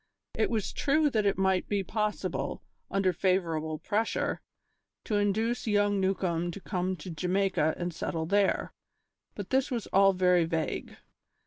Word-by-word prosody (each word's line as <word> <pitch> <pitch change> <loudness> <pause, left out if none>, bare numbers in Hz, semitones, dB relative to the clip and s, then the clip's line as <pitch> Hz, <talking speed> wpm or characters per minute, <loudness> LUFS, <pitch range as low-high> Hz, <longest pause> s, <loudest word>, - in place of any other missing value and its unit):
It - - +1
was 220 -4 -2
true 295 +1 +2
that 215 -4 +2
it 200 - +1
might 190 -1 +1
be 200 -2 0
possible, 210 +2 -2 0.3
under 195 -2 +1
favourable 165 -4 0
pressure, 215 +7 -1 0.6
to 210 - 0
induce 220 +4 0
young 205 -1 +2
Newcombe 180 -3 0
to 175 - -6
come 185 -1 -2
to 175 +2 -8
Jamaica 180 -1 +1
and 175 -1 -3
settle 160 0 -3
there, 200 +3 +1 0.6
but - - -7
this 265 0 +2
was 235 -4 -2
all 195 0 +6
very 180 -2 +3
vague. 165 -1 -3
190 Hz, 145 wpm, -29 LUFS, 175-205 Hz, 0.6 s, all